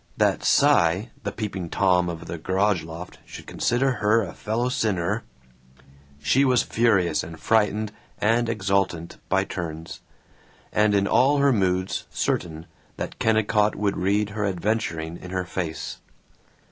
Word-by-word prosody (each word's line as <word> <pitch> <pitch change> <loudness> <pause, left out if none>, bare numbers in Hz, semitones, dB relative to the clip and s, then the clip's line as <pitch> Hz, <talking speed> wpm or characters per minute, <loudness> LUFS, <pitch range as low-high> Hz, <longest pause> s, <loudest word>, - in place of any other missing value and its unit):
That - - +2
Cy, 90 +8 +3
the 100 - -3
Peeping 100 -5 -4
Tom 90 -2 +2
of 85 -1 -6
the 85 - -6
garage 95 +2 +1
loft, 80 +3 -9
should - - -11
consider 130 +3 +1
her 110 +2 +3
a 95 - -6
fellow 115 +3 -2
sinner 95 -8 0 1.0
She 75 - +3
was 125 -4 +3
furious 105 -7 +2
and 80 0 -9
frightened 110 -1 +1 0.3
and 115 +2 +2
exultant 95 -6 -1
by - - +3
turns, 80 -2 -6 0.7
and 105 -1 +3
in 100 -1 +3
all 135 +7 +4
her 140 -1 +4
moods 95 -3 0
certain 80 -2 -2 0.3
that - - -5
Kennicott 110 -1 +2
would 100 -1 0
read 100 +3 0
her 105 0 -3
adventuring 90 -4 -2
in 90 - -10
her 90 0 -2
face. 85 -3 -4
100 Hz, 140 wpm, -24 LUFS, 85-110 Hz, 1.0 s, all